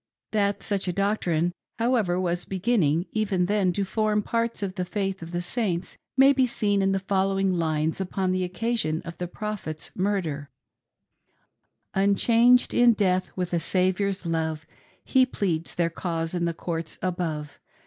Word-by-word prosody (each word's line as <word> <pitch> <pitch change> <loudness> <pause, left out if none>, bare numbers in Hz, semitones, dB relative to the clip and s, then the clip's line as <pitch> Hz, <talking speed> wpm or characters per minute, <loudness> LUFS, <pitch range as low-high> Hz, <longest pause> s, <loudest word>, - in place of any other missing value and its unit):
Thgt 200 -1 +1
such 200 -2 -1
a - - +1
doctrine, 175 -4 0 0.2
however, 225 -7 +1
was 175 -1 -1
begin 205 +5 0
ning, 160 +1 +2
even 200 -5 +1
then, 200 -1 +2
to 200 +2 -1
form 210 +1 +1
part 230 -1 -1
of 190 -2 -2
the 180 - -2
faith 195 +1 -2
of 165 0 -8
the 175 0 -2
Saints, 180 -3 -2 0.2
may 270 +1 +7
be' 260 -1 +3
seen 205 -4 +1
in 195 0 +2
the 195 - +2
following 195 0 +1
lines 160 0 0
upon 190 0 -1
the 185 0 0
occasion 180 -3 -1
of 170 - -7
the 180 - -2
Pcophet's 190 -6 -5
murder: 175 -8 -1 0.7
" - - -47
Unchanged 235 +5 +4
in 240 -1 +6
death, 185 -3 +1
with 180 -1 -3
a 170 - +2
Saviour's 185 +3 0
love, 160 -1 -1 0.4
He 260 - +4
pleads 175 -10 -2
their 170 -1 +1
cause 165 -1 -3
in 175 -1 0
the 170 -1 -1
courts 165 -1 -4
above. 165 -5 -3
185 Hz, 165 wpm, -26 LUFS, 170-205 Hz, 0.7 s, may